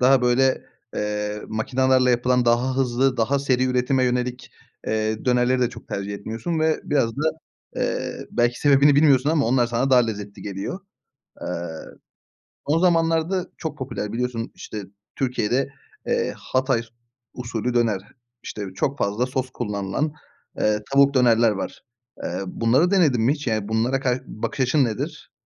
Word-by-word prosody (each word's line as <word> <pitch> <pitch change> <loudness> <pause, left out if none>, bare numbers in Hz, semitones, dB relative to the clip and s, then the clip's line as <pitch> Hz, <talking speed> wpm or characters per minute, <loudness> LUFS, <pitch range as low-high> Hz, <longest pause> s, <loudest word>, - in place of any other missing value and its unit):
daha 130 0 +5
böyle, 130 +2 +2 0.3
eee, 105 0 -2
makinalarla 130 +3 +2
yapılan, 125 +1 +2
daha 120 +2 +2
hızlı, 130 0 +1
daha 125 +4 +1
seri 130 -2 +1
üretime 130 +1 +1
yönelik, 125 0 -2 0.4
eee, 110 0 -1
dönerleri 125 0 +2
de 125 - +3
çok 115 - -12
tercih 100 +1 -4
etmiyorsun 115 +11 -3
ve 160 0 +2
biraz 135 -6 +1
da, 145 - -2 0.5
eee, - - -2
belki 120 0 +1
sebebini 145 0 +5
bilmiyorsun 145 -1 +4
ama 155 -6 +2
onlar 120 0 +3
sana 120 +3 0
daha 125 -1 +7
lezzetli 105 -2 -6
geliyor. 100 - -5 0.6
Eee, - - -5 1.2
son 155 +3 +3
zamanlarda 165 +1 +2
çok 155 -2 -5
popüler, 130 -6 -4
biliyorsun, 120 -1 -3
işte 105 -1 -7 0.3
Türkiye'de, 125 0 0 0.4
eee, - - 0
Hatay 130 -2 0
s 115 - -17 0.5
usulü 120 -1 -3
döner, 115 -5 +2 0.4
işte 105 - -6
çok 140 +1 -1
fazla 105 +5 0
sos 130 0 -3
kullanılan, 105 +5 -2 0.5
ııı, 105 0 +2
tavuk 140 0 +5
dönerler 120 -3 +5
var. 100 -2 -4 0.4
Eee, 90 - -3
bunları 120 - +2
denedin 155 - +3
mi 125 +5 +4
hiç? 150 -1 -6
Yani, 110 -3 -1
bunlara 115 +5 +1
kar 130 -1 0
bakış 135 +5 -5
açın 135 +2 +3
nedir? 110 -3 -4
125 Hz, 150 wpm, -23 LUFS, 115-135 Hz, 1.2 s, daha